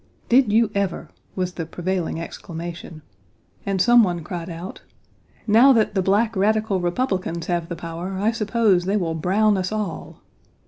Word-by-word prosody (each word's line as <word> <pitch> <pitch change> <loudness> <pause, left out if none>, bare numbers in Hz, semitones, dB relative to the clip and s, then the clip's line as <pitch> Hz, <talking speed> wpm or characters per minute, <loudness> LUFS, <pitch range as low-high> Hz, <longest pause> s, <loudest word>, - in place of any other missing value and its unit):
"Did 245 -3 +4
you 220 0 +3
ever!" 195 -5 -2 0.3
was 185 -1 -2
the 165 -3 -5
prevailing 175 -1 -3
exclamation, 165 -1 -8 0.6
and 195 -1 0
some 240 +5 +6
one 175 -4 -2
cried 170 +1 -6
out: 170 +2 -8 0.6
"Now 235 +6 +6
that 220 -4 +2
the 195 - +1
black 210 +4 +1
radical 210 0 +1
Republicans 175 -3 -2
have 175 -1 -2
the 170 - -4
power 170 +3 -6
I 210 +4 +1
suppose 215 -4 +1
they 200 +3 +1
will 170 -5 -1
Brown 195 +7 +2
1 - - 0
us 185 +1 -3
all. 210 -5 -5
190 Hz, 165 wpm, -22 LUFS, 170-215 Hz, 0.6 s, some